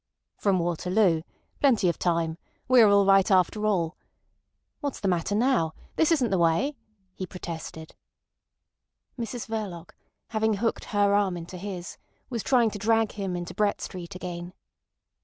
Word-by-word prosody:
"From 195 -2 +1
Waterloo. 175 +1 +1 0.4
Plenty 235 -9 +3
of 170 - 0
time. 165 -1 0 0.3
We 255 -1 +7
are 215 - +7
all 200 0 +5
right 195 +1 +5
after 200 +3 +2
all.... 175 -5 0 0.8
What's 285 -2 -4
the 200 - -2
matter 180 +2 0
now? 225 -9 +2 0.2
This 320 0 +3
isn't 260 -9 +2
the 190 - +2
way," 170 - +2 0.4
he 185 - -6
protested. 165 -3 -7 1.2
Mrs 235 -1 -5
Verloc, 200 -7 -5 0.4
having 220 -1 +1
hooked 225 +3 -1
her 205 -1 +2
arm 200 -3 +2
into 170 +2 -8
his, 180 -1 -6 0.3
was 235 -3 -2
trying 240 -3 +3
to 205 - -6
drag 225 +1 +2
him 195 -3 -4
into 175 0 -5
Brett 210 -1 +1
Street 180 -2 -7
again. 180 -1 -6
195 Hz, 150 wpm, -27 LUFS, 175-220 Hz, 1.2 s, We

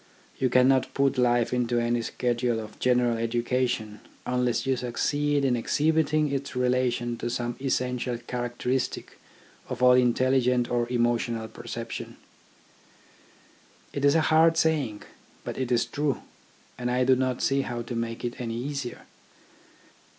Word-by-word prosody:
You 130 - +2
cannot 130 +1 +4
put 140 -2 +2
life 120 -1 +2
into 120 -1 0
any 120 0 0
schedule 120 0 -1
of 110 -1 -9
general 125 -2 +2
education 120 -2 -1 0.3
unless 125 -1 0
you 135 0 +2
succeed 145 +4 0
in 125 -2 +2
exhibiting 155 +4 +1
its 140 -1 -3
relation 125 -1 0
to - - -2
some 120 0 -2
essential 125 -2 -1
character 120 0 -4
istic 130 0 -1 0.6
of - - -3
all 125 - +8
intelligent 125 0 +2
or 120 -1 0
emotional 120 -2 0
perception. - - -7 1.8
It 140 - -3
is 140 +2 +5
a 165 - +4
hard 160 +1 +4
saying, 145 -10 0 0.4
but - - -5
it 130 -1 -2
is 120 -1 +3
true; 140 +3 -2 0.6
and 125 0 -2
I 125 +1 +2
do 130 +1 +5
not 130 -1 -1
see 135 0 +2
how 120 -3 -4
to 120 - -6
make 115 0 -3
it 120 +1 -4
any 115 -2 -3
easier. 140 0 -4
125 Hz, 145 wpm, -26 LUFS, 120-135 Hz, 1.8 s, all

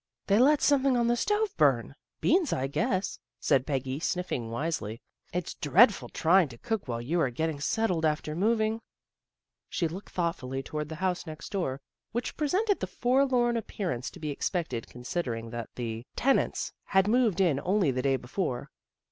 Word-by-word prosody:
"They 200 +2 +4
let 290 +3 +5
something 275 -3 +4
on 235 - +2
the 240 +1 +3
stove 420 - 0
burn; - - +3 0.3
beans, 350 -6 +3
I 130 - 0
guess," 190 - -1 0.2
said 130 -1 +2
Peggy, 135 -1 -2
sniffing 180 -10 -2
wisely. 115 -4 -3 0.2
" - - -37
It's 180 -1 -3
dreadful 200 - +4
trying 175 +1 +4
to 120 - -11
cook 225 - -3
while 115 -1 -2
you 165 +7 0
are 135 - +2
getting 155 +4 -2
settled 180 +1 0
after 150 0 0
moving." 220 +3 +1 0.9
She 170 - 0
looked 180 +5 -8
thoughtfully 135 -7 -2
toward 150 0 -4
the 160 - -5
house 180 -1 -1
next 155 +4 -8
door, 140 -10 -2 0.3
which 240 +2 -2
presented 385 +7 +1
the - - -2
forlorn 250 -1 +2
appearance 180 - -3
to - - -13
be 150 -2 -3
expected 155 - -2
considering 125 -3 -4
that 120 -2 -5
the 115 -1 -5
tenants 270 +2 +1
had 190 0 +3
moved 225 -4 +3
in 170 -8 +3
only 190 -5 +2
the 130 0 -1
day 135 0 +2
before. 125 +1 -3
175 Hz, 170 wpm, -29 LUFS, 135-225 Hz, 0.9 s, let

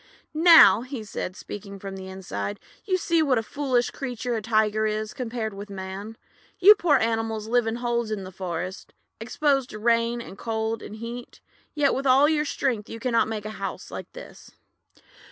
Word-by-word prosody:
"Now," 325 -6 +8 0.2
said 185 -3 -5
he, - - -14
speaking 200 -1 -8
from 195 0 -7
inside, 190 - -5 0.3
"you 375 -2 +1
see 335 -2 +1
what 275 -5 +2
a 225 - 0
foolish 255 -1 0
creature 245 -2 -4
a 225 - -1
Tiger 215 0 +2
is 215 0 -3
compared 230 -3 -4
with 200 +1 -8
Man. 195 +3 -7 0.4
You 400 +3 +9
poor 345 -7 +3
animals 225 -1 -1
live 240 0 +2
in 225 - -1
holes 235 -1 -1
in 210 -3 -3
the 185 - -8
forest, 185 0 -5 0.3
exposed 270 +3 0
to 215 - -7
rain, 230 +1 +1
and 200 -4 -10
cold, 225 0 -2
and 215 - -8
heat; 235 +2 -8 0.4
yet 290 -2 +3
with 270 +1 -1
all 270 +3 +6
your 305 -1 +1
strength 245 -7 -2
you 230 - -7
cannot 235 -2 +1
make 215 -1 -4
a 215 - -4
house - - -5
like - - -7
this. - - -12
225 Hz, 180 wpm, -25 LUFS, 210-255 Hz, 0.4 s, You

